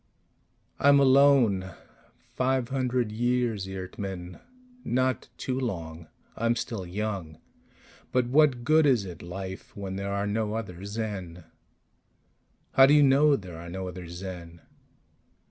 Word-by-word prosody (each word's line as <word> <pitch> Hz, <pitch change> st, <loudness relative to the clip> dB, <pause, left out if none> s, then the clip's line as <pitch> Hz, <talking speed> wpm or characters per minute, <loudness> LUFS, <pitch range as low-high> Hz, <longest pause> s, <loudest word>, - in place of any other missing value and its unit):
"I'm 140 Hz, 0 st, +6 dB
alone. 130 Hz, -9 st, +4 dB, 0.6 s
Five 130 Hz, -1 st, 0 dB
hundred 125 Hz, -4 st, 0 dB
years, 120 Hz, -3 st, 0 dB
Eert 95 Hz, -1 st, -7 dB
mn 90 Hz, -3 st, -6 dB, 0.4 s
not 130 Hz, +1 st, 0 dB
too 130 Hz, 0 st, -2 dB
long. 85 Hz, -9 st, -5 dB, 0.3 s
I'm 115 Hz, +1 st, +1 dB
still 100 Hz, -6 st, -4 dB
young. 95 Hz, -5 st, -4 dB, 0.7 s
But 125 Hz, -1 st, +2 dB
what 130 Hz, -1 st, +3 dB
good 155 Hz, +3 st, +4 dB
is 120 Hz, -7 st, +3 dB
it 90 Hz, -3 st, -9 dB
life 95 Hz, +3 st, -8 dB
when 95 Hz, -1 st, -5 dB
there 100 Hz, 0 st, -3 dB
are 100 Hz, 0 st, -1 dB
no 105 Hz, +1 st, -1 dB
other 95 Hz, -5 st, -6 dB
Zen?" 100 Hz, -5 st, -5 dB, 1.3 s
"How 135 Hz, 0 st, +7 dB
do 145 Hz, -, +5 dB
you 150 Hz, -, +6 dB
know 140 Hz, +2 st, +5 dB
there 90 Hz, -8 st, -8 dB
are 85 Hz, +1 st, -9 dB
no 95 Hz, +1 st, -5 dB
other 90 Hz, -1 st, -7 dB
Zen?" 85 Hz, -1 st, -8 dB
105 Hz, 130 wpm, -27 LUFS, 95-130 Hz, 1.3 s, How